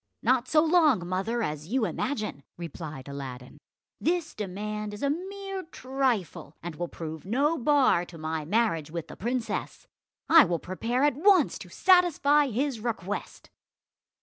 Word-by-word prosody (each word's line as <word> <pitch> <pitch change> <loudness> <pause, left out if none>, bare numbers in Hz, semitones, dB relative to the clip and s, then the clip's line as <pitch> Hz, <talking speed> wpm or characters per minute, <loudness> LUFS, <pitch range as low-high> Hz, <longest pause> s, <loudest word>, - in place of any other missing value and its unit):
"Not 250 +2 +2
so 305 0 +4
long, 310 - +4
mother, 195 +6 -1
as 150 -2 -4
you 240 +3 +1
imagine," 215 - -3 0.2
replied 160 -5 -7
Aladdin, 130 -2 -8 0.4
"This 340 -1 0
demand 210 +1 -4
is 205 - -8
a 280 - +2
mere 390 +3 -5
trifle, 255 - -2
and 175 -1 -5
will 175 +2 -3
prove 160 -2 -7
no 275 - +1
bar 275 - +3
to 175 - -12
my 155 0 -3
marriage 165 -4 0
with 170 0 -6
the - - -9
princess. 240 +3 -3 0.4
I 330 -2 +9
will 175 -6 0
prepare 230 - -2
at 295 - +4
once 390 +4 +4
to - - -10
satisfy 320 -6 +4
his 260 +1 -1
request." 210 -3 -5
225 Hz, 150 wpm, -27 LUFS, 170-290 Hz, 0.4 s, I